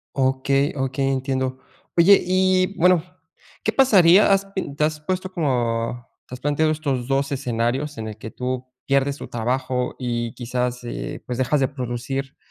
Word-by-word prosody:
Okey, 135 +1 +1
okey, 135 0 -1
entiendo. 130 -1 -2 0.4
Oye, 190 +4 +7
y 185 +1 +2
bueno, 180 -1 +4 0.6
¿qué - - +1
pasaría? 200 -7 +6
¿Has 195 0 +3
pin 190 -7 -5
te 150 - 0
has 155 0 0
puesto 185 +4 -3
como 120 -6 -1 0.2
te 125 - -7
has - - -12
planteado 145 +3 +1
estos 140 -6 -2
2 140 +1 0
escenarios 130 +2 -1
en 110 -1 -5
el 105 - -9
que 110 0 -8
tú 130 0 -4 0.2
pierdes 140 +1 +1
tu - - -8
trabajo 125 +2 -2
y 120 -2 -2
quizás, 125 0 -3
eh, 120 - -5
pues 125 -1 -4
dejas 130 +3 +1
de 135 - +2
producir 130 +1 -4
135 Hz, 165 wpm, -22 LUFS, 125-155 Hz, 0.6 s, Oye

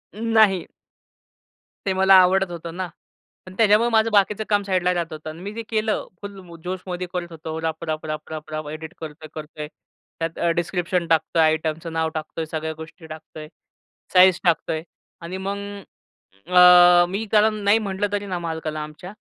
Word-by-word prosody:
नाही. 220 -4 +3 1.2
ते 195 - +1
मला 190 +1 +5
आवडत 190 0 +2
होतं 170 -1 -6
ना. 185 -1 -2 0.6
पण 185 - -11
त्याच्यामुळे 220 +1 +4
माझं 225 -1 +3
बाकीचं 210 +1 +2
काम 205 -1 +2
साईडला 185 -2 +1
राहत 170 -2 -3
होतं 155 0 -7
अन् 155 +1 -9
मी 200 - -5
जे 230 +1 -5
केलं, 215 -1 -1
फुल 200 -1 -8 0.2
जोशमध्ये 180 0 -4
करत 175 -1 -4
होतो 160 0 -6
राप, 160 0 -3
राप, 155 -1 -3
राप, 155 0 -5
राप, 155 -1 -7
राप! 155 -1 -4
एडिट 160 +2 -7
करतोय, 155 0 -8
करतोय, 155 -1 -7 0.5
त्यात 165 0 -3
अ, 170 - +1
डिस्क्रिप्शन 175 0 -1
टाकतोय, 165 0 +2
आयटमचं 160 +1 0
नाव 160 0 0
टाकतोय, 155 +1 -4
सगळ्या 160 0 -4
गोष्टी 160 +2 -11
टाकतोय, 155 0 -10 0.7
साइज 185 -1 +6
टाकतोय 160 -2 +1 0.4
आणि 170 +3 -6
मग, 200 +1 -2 0.9
अ, 180 -1 +8
मी 200 +4 -3
कारण 215 0 +4
नाही 205 +2 +4
म्हटलं 200 -1 -2
तरी 205 0 -2
ना 180 -2 -3
मालकाला 160 -2 -4
आमच्या, 155 +5 -10
175 Hz, 165 wpm, -23 LUFS, 160-195 Hz, 1.2 s, अ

